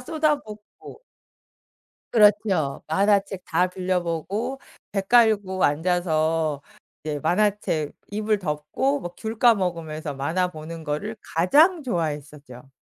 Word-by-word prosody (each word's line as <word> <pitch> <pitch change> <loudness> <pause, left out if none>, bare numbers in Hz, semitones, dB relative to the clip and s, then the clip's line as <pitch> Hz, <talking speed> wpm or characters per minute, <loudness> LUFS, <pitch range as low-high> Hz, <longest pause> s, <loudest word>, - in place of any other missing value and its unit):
쏟아붓고. 295 - -3 1.1
그렇죠. 205 - +3
만화책 195 +1 +1
다 175 +3 +2
빌려보고 185 - -2 0.3
배 195 - 0
깔고 205 -3 +3
앉아서 160 -1 +1 0.4
이제 150 -1 -3
만화책 175 -3 0 0.2
이불 210 0 0
덮고 190 - -1
뭐 175 -5 -7
귤 220 0 -5
까먹으면서 170 - +1
만화 165 +7 0
보는 160 0 -9
거를 185 +10 -3 0.2
가장 300 - +4
좋아했었죠. 150 - -5
180 Hz, 235 characters per minute, -24 LUFS, 155-215 Hz, 1.1 s, 가장